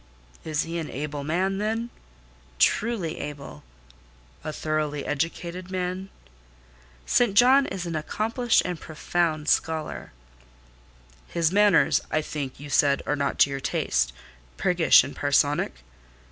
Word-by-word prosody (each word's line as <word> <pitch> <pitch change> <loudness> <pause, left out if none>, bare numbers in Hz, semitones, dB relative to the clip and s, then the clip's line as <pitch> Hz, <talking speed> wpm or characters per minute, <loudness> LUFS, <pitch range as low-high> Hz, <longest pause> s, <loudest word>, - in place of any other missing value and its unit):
"Is 155 -2 -1
he 170 +1 -4
an 160 - -5
able 145 0 -5
man, 185 +6 0
then?" 225 +3 -2 0.7
"Truly 195 - +1
able." 140 - -8 0.8
"A 155 - -4
thoroughly 150 -1 -2
educated 170 +4 -3
man?" 185 +1 -3 1.0
"St. 235 -5 +2
John 260 +5 +6
is 185 -2 -5
an 170 -1 -4
accomplished 225 +9 +1
and 180 -3 -3
profound 155 -1 -2
scholar." 160 -1 -1 1.2
"His 170 -1 0
manners, 205 -3 +4
I 155 - 0
think, 140 -4 -5
you 145 - -8
said 140 0 +2
are 145 - 0
not 140 -1 -1
to 140 - +5
your 135 - -3
taste?—priggish 60 - +1
and - - -7
parsonic?" - - +1
160 Hz, 120 wpm, -25 LUFS, 145-190 Hz, 1.2 s, John